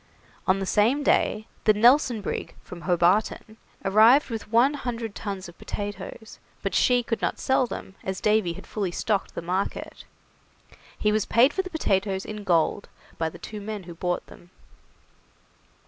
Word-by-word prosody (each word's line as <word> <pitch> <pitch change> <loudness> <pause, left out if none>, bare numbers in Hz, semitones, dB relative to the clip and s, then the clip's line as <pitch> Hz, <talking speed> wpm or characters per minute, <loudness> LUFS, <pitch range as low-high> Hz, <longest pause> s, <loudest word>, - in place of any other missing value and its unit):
On 185 - +4
the 195 - -2
same 230 +10 +2
day 215 -5 +2 0.2
the 215 - +6
'Nelson' 240 +1 +4
brig, - - -4
from 175 -1 -10
Hobarton, 185 +5 +1 0.3
arrived 225 +8 +5
with 220 -1 -5
one 245 +5 +4
hundred 235 -6 -4
tons 195 -3 -5
of 175 - -15
potatoes, 205 +2 -7 0.2
but - - -2
she 245 -1 +3
could 230 -1 -3
not - - -1
sell 260 -1 +2
them, 195 - -7
as 190 -1 -3
Davy 210 -5 +2
had - - -11
fully 200 -4 -2
stocked 200 +3 -2
the - - -4
market. 185 +3 -3 0.9
He 210 - +1
was 215 -1 0
paid 250 +6 +4
for 380 - 0
the 370 - -8
potatoes 195 - 0
in 210 -1 -6
gold 175 +1 +1 0.3
by 160 -1 0
the 175 - -12
two 210 +4 -8
men 210 -1 -5
who 175 -1 -9
bought 175 +1 -2
them. 175 - -16
210 Hz, 165 wpm, -25 LUFS, 190-230 Hz, 0.9 s, the